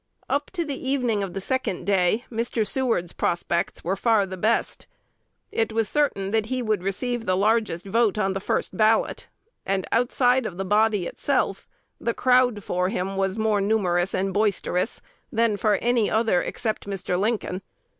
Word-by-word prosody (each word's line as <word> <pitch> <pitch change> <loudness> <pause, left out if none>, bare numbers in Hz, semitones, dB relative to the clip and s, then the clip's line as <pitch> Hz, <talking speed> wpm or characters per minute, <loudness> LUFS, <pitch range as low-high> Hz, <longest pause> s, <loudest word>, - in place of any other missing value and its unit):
Up 285 +2 -1
to 345 -3 -1
the 270 -3 -4
evening 245 -6 +1
of 195 -2 -4
the - - -1
second 260 -4 -2
day, 200 +4 +2
Mr. 230 -1 -1
Seward's 220 -7 0
prospects 170 0 -1
were 185 +3 0
far 220 -1 +3
the 190 -1 -6
best. 215 +5 -1 0.6
It 225 0 0
was 225 -1 0
certain 205 -10 0
that 220 -1 +1
he 255 0 -2
would 215 -4 0
receive 230 +5 -2
the 185 0 +2
largest 210 -4 +1
vote 215 +1 +2
on 195 -2 +1
the 195 - -2
first - - -2
ballot; 220 0 +2 0.4
and 190 -1 -1
outside 245 +1 +2
of 175 - -8
the 195 - -3
body 210 -1 +2
itself 255 -2 -1 0.3
the 235 0 -1
"crowd" 250 -4 +3
for 180 0 0
him 195 0 -2
was 195 +1 0
more 215 -2 +1
numerous 190 -3 +1
and 190 0 -1
boisterous 205 -2 0 0.3
than 230 -3 +2
for 210 0 +2
any 235 0 +1
other, 220 -5 +2
except 215 -3 -3
Mr. 195 -2 -2
Lincoln. 205 -3 -1
215 Hz, 170 wpm, -24 LUFS, 195-235 Hz, 0.6 s, far